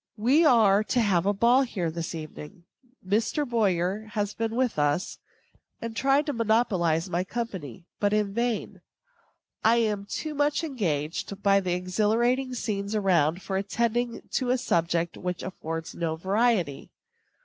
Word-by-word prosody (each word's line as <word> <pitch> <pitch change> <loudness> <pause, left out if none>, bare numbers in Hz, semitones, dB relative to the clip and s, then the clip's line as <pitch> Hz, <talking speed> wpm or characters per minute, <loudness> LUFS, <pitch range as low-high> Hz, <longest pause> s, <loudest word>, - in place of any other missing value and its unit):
We 260 +10 +4
are 215 -7 +5
to 250 - 0
have 195 -5 +2
a - - +4
ball 235 +6 +4
here 190 -11 -2
this 170 +1 -5
evening. 160 +3 -9 0.4
Mr. 225 +8 0
Boyer 205 -3 0
has 205 -2 -1
been 225 0 -2
with 250 -9 0
us, 145 +4 0 0.6
and 230 -1 -6
tried 275 +4 +2
to 290 - -2
monopolize 200 -8 +1
my 175 0 -1
company; 190 - -6
but 205 -1 +2
in 210 -2 0
vain. 235 0 -2 0.8
I 225 +1 +5
am 210 -4 0
too 310 +8 -4
much 290 +2 +1
engaged 190 - -3
by 200 0 +5
the 185 -2 -1
exhilarating 225 +8 +1
scenes 205 -2 -3
around 180 -4 +2
for 190 - -2
attending 235 +4 -1
to 255 -2 -1
a 255 - +3
subject 170 -6 0
which 180 -1 -4
affords 165 -3 -5
no 165 -2 -2
variety. 190 - 0
205 Hz, 150 wpm, -27 LUFS, 175-235 Hz, 0.8 s, are